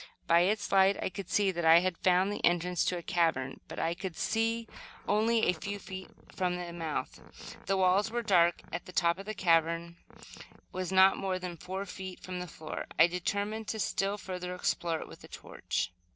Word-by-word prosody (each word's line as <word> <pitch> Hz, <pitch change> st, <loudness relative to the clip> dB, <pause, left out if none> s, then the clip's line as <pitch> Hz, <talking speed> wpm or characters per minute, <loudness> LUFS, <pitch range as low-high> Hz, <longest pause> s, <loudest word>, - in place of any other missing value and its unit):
By 170 Hz, 0 st, +5 dB
its 205 Hz, +4 st, +1 dB
light 195 Hz, 0 st, +5 dB
I -, -, -1 dB
could 190 Hz, 0 st, -7 dB
see 200 Hz, -2 st, +2 dB
that 170 Hz, -1 st, -3 dB
I 165 Hz, +1 st, +7 dB
had 185 Hz, -1 st, 0 dB
found 185 Hz, +2 st, +3 dB
the -, -, -6 dB
entrance 175 Hz, 0 st, +2 dB
to 180 Hz, -, 0 dB
a 170 Hz, -, -7 dB
cavern, 165 Hz, -8 st, 0 dB
but -, -, -9 dB
I 165 Hz, -, 0 dB
could 180 Hz, -1 st, -6 dB
see 225 Hz, +1 st, 0 dB, 0.4 s
only 220 Hz, +2 st, +3 dB
a -, -, +3 dB
few 200 Hz, +5 st, -5 dB
feet 190 Hz, -1 st, -8 dB, 0.3 s
from 180 Hz, -1 st, 0 dB
the 175 Hz, -1 st, -6 dB
mouth. 165 Hz, -3 st, -4 dB, 0.5 s
The 195 Hz, -, +2 dB
walls 190 Hz, +3 st, +3 dB
were 240 Hz, +1 st, -2 dB
dark 175 Hz, -5 st, +3 dB
and 170 Hz, -, -3 dB
the 180 Hz, -, -11 dB
top 170 Hz, 0 st, +2 dB
of 200 Hz, -, -9 dB
the 215 Hz, -, -4 dB
cavern 170 Hz, -1 st, +1 dB, 0.7 s
was 185 Hz, 0 st, -4 dB
not 190 Hz, 0 st, +6 dB
more 190 Hz, -1 st, -1 dB
than 180 Hz, -1 st, -6 dB
four 190 Hz, +4 st, -5 dB
feet 190 Hz, -1 st, -8 dB
from 185 Hz, -1 st, -6 dB
the 180 Hz, -, -5 dB
floor. 155 Hz, -1 st, -7 dB
I -, -, +8 dB
determined 200 Hz, +5 st, -2 dB
to 220 Hz, -, -3 dB
still 200 Hz, 0 st, 0 dB
further 180 Hz, -2 st, -5 dB
explore 170 Hz, -2 st, -1 dB
it -, -, -8 dB
with -, -, -13 dB
a -, -, -11 dB
torch. 85 Hz, -, -4 dB
185 Hz, 205 wpm, -31 LUFS, 170-195 Hz, 0.7 s, I